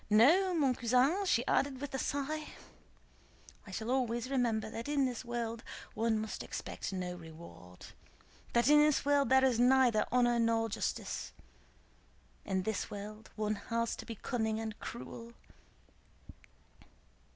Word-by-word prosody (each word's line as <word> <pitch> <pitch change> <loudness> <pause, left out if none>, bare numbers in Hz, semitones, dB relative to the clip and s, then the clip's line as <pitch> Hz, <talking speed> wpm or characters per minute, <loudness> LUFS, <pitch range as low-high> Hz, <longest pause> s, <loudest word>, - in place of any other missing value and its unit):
No, 330 - +5
mon 280 -5 +3
cousin," 255 - +2
she 240 -8 +2
added 275 -2 +1
with 285 0 -6
a 265 - -2
sigh, 300 +3 -2 1.2
"I - - -9
shall 220 +5 -4
always 250 -1 0
remember 230 -5 +1
that 230 +3 -6
in 285 -2 +2
this 250 -2 -3
world 235 -1 -4 0.3
one 225 0 +1
must 215 0 -4
expect - - -5
no 180 -2 -3
reward, 160 - -12 0.7
that 235 0 +3
in 295 +1 +7
this 300 -2 +3
world 285 -3 +3
there 265 0 +5
is 245 -3 +2
neither 250 -3 +4
honor 240 -1 +3
nor 230 0 +2
justice. - - -3 1.1
In 190 -1 -1
this 220 0 -2
world 210 +2 -8
one 215 -1 0 0.2
has 230 0 0
to - - -9
be 230 - -5
cunning 220 -1 -2
and 220 -1 -5
cruel." 235 0 -8
235 Hz, 140 wpm, -33 LUFS, 220-265 Hz, 1.2 s, in